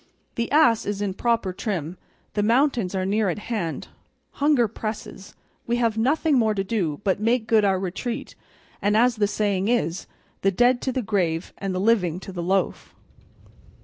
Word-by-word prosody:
The 235 0 -3
ass 245 -7 +4
is 205 -1 -2
in 205 -2 -1
proper 230 -2 0
trim, 180 -5 -3 0.4
the 205 - 0
mountains 230 -3 +2
are 185 -1 -1
near 205 +1 +1
at 175 - -2
hand, 210 -6 -4 0.5
hunger 285 -5 +4
presses, 215 -2 -7 0.3
we 235 - +1
have 230 -2 +1
nothing 280 +5 +2
more 220 -2 +2
to 195 - 0
do 190 -8 -2
but 195 -1 +1
make 230 +2 +1
good 220 -1 +3
our 195 -2 +2
retreat, 195 +6 -4 0.5
and, 205 +1 +2
as 240 +1 +3
the 205 -1 +2
saying 200 -2 0
is, 195 -7 0 0.3
the 195 - +3
dead 245 +5 +3
to 260 - -1
the 255 0 -2
grave 180 -6 -1
and 195 -2 -3
the - - -1
living 185 -5 +2
to 195 - -8
the 180 -2 -5
loaf." 190 +3 -1
210 Hz, 180 wpm, -24 LUFS, 190-235 Hz, 0.5 s, ass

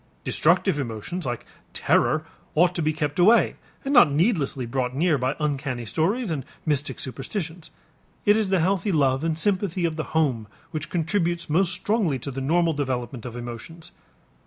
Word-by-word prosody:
Destructive 145 - +2
emotions 130 - -4
like 120 -1 -4 0.3
terror - - +2 0.3
ought 175 +3 +4
to 175 - -2
be 155 0 +2
kept 150 0 -2
away 215 +7 +5 0.3
and 275 - 0
not 240 - +7
needlessly 150 - +1
brought 125 +1 -2
near 160 +2 +3
by 130 +3 0
uncanny 140 -5 -2
stories 190 - 0
and 145 -4 -2 0.2
mystic 145 -2 0
superstitions. 160 - -5 0.6
It 205 -1 +6
is 215 -3 +1
the 190 -1 +3
healthy 190 +3 +1
love 135 -3 +2
and 165 -1 0
sympathy 185 -1 0
of 165 -1 -2
the 155 - -1
home 125 -9 +1 0.2
which 155 -1 -4
contributes 170 -1 -1
most 180 +3 +4
strongly 185 - 0
to 140 +3 -6
the 135 +1 -5
normal 165 +4 +2
development 130 -3 -3
of 120 0 -7
emotions. 120 +8 -8
155 Hz, 165 wpm, -25 LUFS, 135-180 Hz, 0.6 s, not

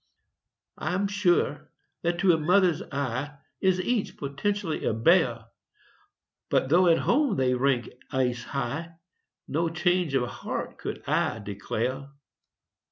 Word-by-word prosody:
I'm 185 +5 0
sure 185 -7 +1 0.3
that 170 0 0
to 190 -2 +5
a - - +3
mother's 180 +1 +3
eye 140 +1 -3 0.2
Is 185 -1 +3
each 225 +2 -1
potentially 160 +5 -2
a - - 0
bear. 120 -3 +3 1.0
But 130 - +1
though 175 +4 +5
at 165 -1 +5
home 270 -4 +2
they 130 -3 +2
rank 125 -1 +1 0.2
ace 125 -2 0
high, 145 +6 -4 0.5
No 165 +2 0
change 175 -2 +1
of 125 -2 +1
heart - - -5
could - - -6
I - - +1
declare. 115 +6 -3
155 Hz, 125 wpm, -27 LUFS, 130-180 Hz, 1.0 s, to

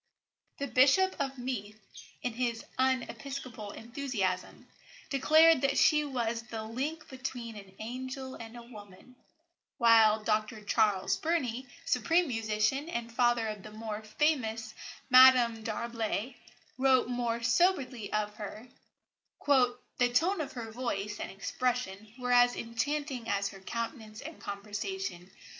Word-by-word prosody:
The 280 - -2
Bishop 275 +9 +4
of 270 -1 -2
Meath, 220 -4 -5 0.4
in 245 - -1
his 235 -1 -2
unepiscopal 260 -3 -2
enthusiasm, 230 -7 -3 0.5
declared 310 +2 +6
that 275 0 +1
she 300 -1 +5
was 235 -4 -2
"the 225 -1 -6
link 275 +9 -4
between 245 -3 -6
an 195 -2 -12
angel 260 +3 -6
and 230 0 -9
a 235 - -9
woman"; 215 +1 -14 0.6
while 225 -3 +5
Dr 215 0 -1
Charles 205 -3 +2
Burney, 265 -7 -1 0.2
supreme 325 +9 +2
musician 225 +5 0
and 235 -6 -4
father 240 -2 +2
of 210 -2 -5
the 215 - -10
more 215 0 -6
famous 220 -2 -1 0.4
Madame 250 -3 +7
d'Arblay, 230 +1 -3 0.5
wrote 260 -2 +4
more 240 -1 -2
soberly 255 - +1
of 210 0 -1
her: 215 +3 -8 0.8
"The 250 -2 +2
tone 335 +8 +2
of 295 - -5
her 230 -3 -6
voice 210 -4 -3
and - - -4
expression 215 0 -3
were 250 -1 -2
as 245 0 +5
enchanting 250 +1 -3
as 200 0 0
her 195 - -11
countenance 220 +1 -5
and 320 +2 -9
conversation. 205 - -5
235 Hz, 125 wpm, -31 LUFS, 220-260 Hz, 0.8 s, Madame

